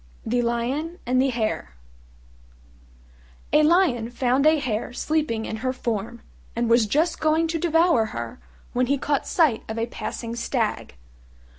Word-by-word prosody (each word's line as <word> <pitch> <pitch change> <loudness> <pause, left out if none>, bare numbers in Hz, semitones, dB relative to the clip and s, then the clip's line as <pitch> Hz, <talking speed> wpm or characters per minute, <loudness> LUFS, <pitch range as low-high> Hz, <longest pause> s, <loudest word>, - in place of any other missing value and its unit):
THE 245 +2 +1
LION 250 +8 -2
AND 255 +1 +2
THE 270 - +2
HARE 220 - -2 1.8
A 300 - +6
Lion 305 -8 +3
found 255 +3 +2
a 315 0 +5
Hare 240 -4 -3
sleeping 270 -6 -1
in 220 - -4
her 255 +3 -1
form, 235 -2 -4 0.3
and 235 0 0
was 230 -1 +4
just 315 +9 +1
going 315 +1 +2
to 330 0 -1
devour 325 -6 +3
her 115 - -6 0.3
when 250 0 +1
he 280 +2 +2
caught 285 +1 -1
sight 305 -10 +2
of 220 - -4
a 230 - 0
passing 235 0 -5
stag. 235 - -2
250 Hz, 150 wpm, -24 LUFS, 230-310 Hz, 1.8 s, A